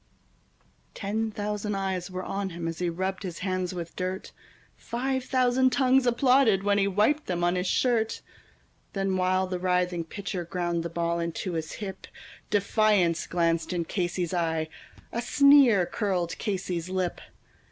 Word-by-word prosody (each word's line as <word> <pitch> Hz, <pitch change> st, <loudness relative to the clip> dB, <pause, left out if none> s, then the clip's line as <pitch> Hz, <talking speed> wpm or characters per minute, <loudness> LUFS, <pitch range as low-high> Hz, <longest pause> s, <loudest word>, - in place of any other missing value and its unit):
Ten 220 Hz, +2 st, -2 dB
thousand 210 Hz, 0 st, -3 dB
eyes 190 Hz, -2 st, -2 dB
were 185 Hz, 0 st, -5 dB
on 195 Hz, 0 st, -3 dB
him 170 Hz, -1 st, -5 dB
as 165 Hz, -1 st, -4 dB
he 175 Hz, -1 st, 0 dB
rubbed 190 Hz, +3 st, -3 dB
his 180 Hz, -4 st, -5 dB
hands 185 Hz, -1 st, -1 dB
with 170 Hz, -2 st, -6 dB
dirt, 185 Hz, +1 st, -4 dB, 0.4 s
Five 260 Hz, +2 st, -2 dB
thousand 255 Hz, 0 st, +3 dB
tongues 260 Hz, -1 st, +3 dB
applauded 245 Hz, -4 st, +4 dB
when 205 Hz, 0 st, +2 dB
he 195 Hz, -, +3 dB
wiped 215 Hz, +11 st, +2 dB
them 175 Hz, -1 st, -1 dB
on 175 Hz, +1 st, +2 dB
his 180 Hz, +1 st, -1 dB
shirt; 230 Hz, -1 st, +1 dB, 0.7 s
Then, 195 Hz, -1 st, 0 dB
while 185 Hz, 0 st, +2 dB
the 185 Hz, -1 st, -3 dB
writhing 180 Hz, -2 st, 0 dB
pitcher 190 Hz, 0 st, -4 dB
ground 175 Hz, 0 st, -2 dB
the 170 Hz, -, -4 dB
ball 170 Hz, 0 st, -1 dB
into 170 Hz, +2 st, -3 dB
his 160 Hz, -1 st, -3 dB
hip, 195 Hz, -2 st, -7 dB, 0.4 s
Defiance 205 Hz, -4 st, +2 dB
glanced 170 Hz, 0 st, 0 dB
in 170 Hz, -2 st, -1 dB
Casey's 175 Hz, -1 st, -2 dB
eye, 160 Hz, -2 st, 0 dB, 0.4 s
a 235 Hz, -, -2 dB
sneer 265 Hz, -6 st, +6 dB
curled 180 Hz, -4 st, -1 dB
Casey's 185 Hz, -4 st, -3 dB
lip. 185 Hz, -1 st, -2 dB
185 Hz, 150 wpm, -27 LUFS, 175-210 Hz, 0.7 s, sneer